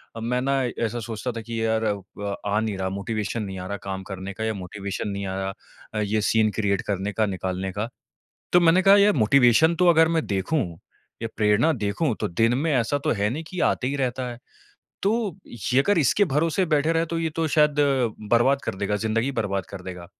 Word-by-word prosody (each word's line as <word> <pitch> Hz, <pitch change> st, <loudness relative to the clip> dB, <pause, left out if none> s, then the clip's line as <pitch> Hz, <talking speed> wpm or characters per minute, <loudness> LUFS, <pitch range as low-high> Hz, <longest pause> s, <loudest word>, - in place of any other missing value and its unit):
अ, -, -, -5 dB
मैं 125 Hz, +2 st, -1 dB
ना, 135 Hz, 0 st, +1 dB, 0.2 s
ऐसा 120 Hz, +2 st, -3 dB
सोचता 115 Hz, +2 st, -4 dB
था 115 Hz, -1 st, -6 dB
कि, 115 Hz, 0 st, -4 dB
"यार, 110 Hz, 0 st, +1 dB
अब 100 Hz, -1 st, -3 dB
आ 105 Hz, +1 st, +1 dB
नहीं 110 Hz, -3 st, -2 dB
रहा 95 Hz, 0 st, -2 dB
मोटिवेशन 105 Hz, +2 st, -3 dB
नहीं 95 Hz, -2 st, -6 dB
आ 90 Hz, -, -6 dB
रहा 100 Hz, +1 st, -4 dB
काम 95 Hz, 0 st, -4 dB
करने 95 Hz, +1 st, -6 dB
का 110 Hz, -, -5 dB
या 110 Hz, 0 st, 0 dB
मोटिवेशन 100 Hz, +1 st, -5 dB
नहीं 100 Hz, 0 st, -4 dB
आ 95 Hz, -, -3 dB
रहा 95 Hz, 0 st, -2 dB, 0.4 s
अ, 110 Hz, -, -2 dB
ये 105 Hz, +1 st, 0 dB
सीन 110 Hz, -1 st, +3 dB
क्रिएट 100 Hz, -2 st, +1 dB
करने 100 Hz, +1 st, -2 dB
का, 110 Hz, -, +1 dB
निकालने 95 Hz, -1 st, -3 dB
का।" 105 Hz, +4 st, -3 dB, 0.6 s
तो 175 Hz, -, +6 dB
मैंने 170 Hz, +2 st, +5 dB
कहा, 195 Hz, +1 st, +7 dB
"यार, 205 Hz, +1 st, +5 dB
मोटिवेशन 125 Hz, +7 st, +5 dB
तो 180 Hz, -, +3 dB
अगर 160 Hz, -1 st, +6 dB
मैं 165 Hz, -1 st, +1 dB
देखूँ, 100 Hz, +10 st, 0 dB, 0.6 s
या 115 Hz, -, -2 dB
प्रेरणा 105 Hz, +8 st, +3 dB
देखूँ, 115 Hz, +3 st, -1 dB
तो -, -, 0 dB
दिन 115 Hz, +7 st, +2 dB
में 155 Hz, +2 st, 0 dB
ऐसा 130 Hz, +2 st, +1 dB
तो 155 Hz, -, +2 dB
है 105 Hz, -, +2 dB
नहीं 155 Hz, +6 st, -4 dB
कि 180 Hz, -, -5 dB
आते 125 Hz, -, +1 dB
ही 140 Hz, +2 st, -1 dB
रहता 130 Hz, -1 st, -1 dB
है। 120 Hz, -, -8 dB, 0.6 s
तो 200 Hz, -, +2 dB, 0.3 s
ये 120 Hz, +3 st, -1 dB
अगर 200 Hz, +4 st, +2 dB
इसके 160 Hz, -, +3 dB
भरोसे 165 Hz, +3 st, +1 dB
बैठे 155 Hz, +1 st, +2 dB
रहे 165 Hz, 0 st, +1 dB
तो 165 Hz, +1 st, -3 dB
ये 165 Hz, -1 st, -1 dB
तो 165 Hz, -1 st, +1 dB
शायद 150 Hz, -1 st, +3 dB, 0.6 s
बर्बाद 130 Hz, +4 st, +4 dB
कर -, -, -3 dB
देगा 100 Hz, +1 st, -1 dB
ज़िंदगी 115 Hz, +5 st, 0 dB
बर्बाद 100 Hz, -6 st, -2 dB
कर 100 Hz, -2 st, -8 dB
देगा।" 90 Hz, -1 st, -8 dB
115 Hz, 220 wpm, -24 LUFS, 100-145 Hz, 0.6 s, कहा